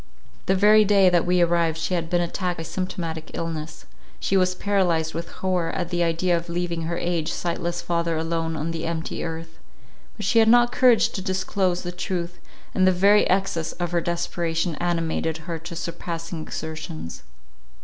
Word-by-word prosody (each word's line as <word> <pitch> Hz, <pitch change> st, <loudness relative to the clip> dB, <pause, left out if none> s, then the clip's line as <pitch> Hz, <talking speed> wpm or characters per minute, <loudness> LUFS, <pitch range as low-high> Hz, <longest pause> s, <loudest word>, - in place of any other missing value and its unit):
The 190 Hz, -, +3 dB
very 210 Hz, +3 st, +6 dB
day 195 Hz, -2 st, +5 dB
that 175 Hz, -1 st, +2 dB
we 180 Hz, 0 st, +3 dB
arrived 170 Hz, -2 st, +2 dB
she 165 Hz, +3 st, -2 dB
had 165 Hz, -2 st, -1 dB
been 175 Hz, 0 st, +2 dB
attacked 175 Hz, +1 st, -2 dB
by 165 Hz, -, -4 dB
symptomatic 165 Hz, -2 st, -4 dB
illness. 160 Hz, -2 st, -5 dB, 0.3 s
She 195 Hz, -, 0 dB
was 185 Hz, -1 st, +3 dB
paralyzed 175 Hz, -6 st, +1 dB
with 165 Hz, +1 st, -5 dB
horror 180 Hz, -3 st, -1 dB
at 175 Hz, -2 st, -2 dB
the 175 Hz, 0 st, 0 dB
idea 170 Hz, +1 st, +2 dB
of 170 Hz, 0 st, -4 dB
leaving 170 Hz, -1 st, -2 dB
her 170 Hz, +1 st, -2 dB
aged, 170 Hz, -2 st, -1 dB
sightless 170 Hz, 0 st, -2 dB
father 170 Hz, -1 st, 0 dB
alone 165 Hz, 0 st, -1 dB
on 160 Hz, +2 st, -2 dB
the 165 Hz, 0 st, -3 dB
empty 165 Hz, -1 st, -3 dB
earth; 165 Hz, 0 st, -6 dB, 0.6 s
but 210 Hz, -, -4 dB
she 230 Hz, -, +4 dB
had 220 Hz, -, +5 dB
not 240 Hz, +1 st, +6 dB
courage 250 Hz, -3 st, +5 dB
to 190 Hz, -, -5 dB
disclose 185 Hz, -1 st, 0 dB
the 175 Hz, -, -4 dB
truth, 175 Hz, -1 st, -4 dB, 0.3 s
and 185 Hz, 0 st, +3 dB
the -, -, +6 dB
very 200 Hz, +3 st, +4 dB
excess 185 Hz, -4 st, 0 dB
of 175 Hz, -1 st, -3 dB
her 170 Hz, -1 st, +1 dB
desperation 170 Hz, 0 st, -1 dB
animated 165 Hz, -2 st, -1 dB
her 170 Hz, -2 st, -4 dB
to 170 Hz, +2 st, -8 dB
surpassing 165 Hz, 0 st, -5 dB
exertions. 155 Hz, -, -6 dB
170 Hz, 180 wpm, -24 LUFS, 165-185 Hz, 0.6 s, very